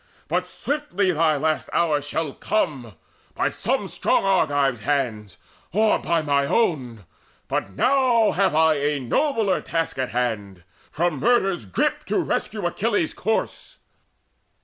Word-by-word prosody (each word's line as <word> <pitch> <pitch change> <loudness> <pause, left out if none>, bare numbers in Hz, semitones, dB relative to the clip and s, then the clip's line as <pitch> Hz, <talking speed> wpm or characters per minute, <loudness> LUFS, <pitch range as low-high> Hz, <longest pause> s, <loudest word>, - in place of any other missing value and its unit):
But - - -1
swiftly 240 -11 -1
thy 160 -2 +2
last 155 +2 -1
hour 155 -4 +2
shall 145 0 -3
come 130 - -2 0.4
By - - +1
some - - -1
strong - - +1
Argive's 145 -9 +2
hands, 110 - -2 0.3
or 215 +5 +3
by 170 -2 0
mine 140 -1 +1
own, 130 - 0 0.4
But 95 - -2
now 250 - +3
have 190 -2 +1
I 160 -1 +4
a 145 0 0
nobler 220 - 0
task 165 -4 -2
in 130 - -1
hand, 105 -7 -3 0.3
From 170 -2 -1
murder's 195 - +1
grip 95 - 0
to - - -1
rescue 210 -3 -2
Achilles' 200 -1 0
corse." 220 +3 -3
155 Hz, 130 wpm, -23 LUFS, 135-195 Hz, 0.4 s, I